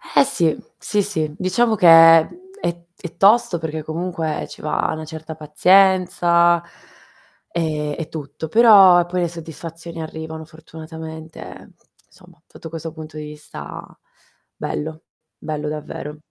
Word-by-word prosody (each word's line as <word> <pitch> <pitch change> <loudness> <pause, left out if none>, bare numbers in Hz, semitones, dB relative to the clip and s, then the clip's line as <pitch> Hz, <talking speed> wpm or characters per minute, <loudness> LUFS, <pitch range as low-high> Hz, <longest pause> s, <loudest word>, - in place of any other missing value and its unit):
Eh, - - +7
sì. 170 - +1 0.2
Sì, 210 - 0
sì, 160 -7 -2
diciamo 220 +5 +1
che 180 -4 +3
è 165 -1 +8 0.3
è 170 - -4 0.2
è 175 - -9
tosto, 205 -2 +4
perché 160 -1 -5
comunque 160 0 -3
ci - - -12
va 155 - -1
una 155 0 -6
certa 160 0 -8
pazienza. 175 +1 +3 0.9
E 150 -3 -2
e 165 - -5
tutto, 150 0 -7
però 195 -3 +7
poi 180 +1 -2
le 175 - +1
soddisfazioni 165 0 -9
arrivano 160 0 -7
fortunatamente, 160 0 -11
ehm, - - -13 0.3
insomma, 180 -4 -21
sotto 165 - -12
questo 165 0 -7
punto 155 -1 -10
di 155 - -6
vista 150 - -9 0.7
bello, 155 +2 -5 0.3
bello 150 -1 -5
davvero. 150 0 -7
165 Hz, 130 wpm, -20 LUFS, 155-175 Hz, 0.9 s, è